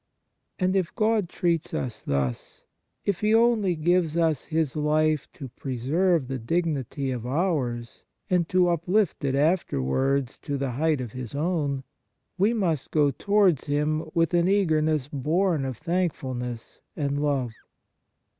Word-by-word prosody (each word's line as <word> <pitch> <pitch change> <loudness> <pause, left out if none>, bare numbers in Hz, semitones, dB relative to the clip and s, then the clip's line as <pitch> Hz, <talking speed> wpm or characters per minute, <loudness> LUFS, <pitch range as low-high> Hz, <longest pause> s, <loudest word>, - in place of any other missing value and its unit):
And 185 0 +1
if 185 -3 0
God 215 -5 +1
treats 170 -3 -1
us 120 -4 -4
thus, 65 -3 -3 0.4
if 200 -3 0
He 215 +1 +3
only 225 -6 +3
gives 170 0 +1
us 160 -5 +1
His 160 -4 -1
life 155 0 +1
to 135 - -8
preserve 135 +6 0
the 135 0 -3
dignity 140 -1 -1
of 120 -2 -4
ours 130 -7 -1 0.2
and 180 -4 +1
to 180 -1 +3
uplift 175 +2 +1
it 135 -1 +1
after 155 - +1
wards 130 - 0
to 145 -2 -3
the 135 -1 -2
height 150 +2 +1
of 120 -4 -5
His 130 0 -7
own, 145 -4 -1 0.5
we 200 +4 +3
must 175 - -1
go 145 -2 +3
towards 195 +1 +2
Him 155 +2 0
with 165 0 +2
an 175 0 +3
eager 190 -6 +3
ness 155 -3 0
born 155 +2 0
of 130 -4 -4
thankfulness 130 -9 -3 0.2
and 145 -1 -1
love. 140 -5 0
155 Hz, 145 wpm, -26 LUFS, 135-175 Hz, 0.5 s, He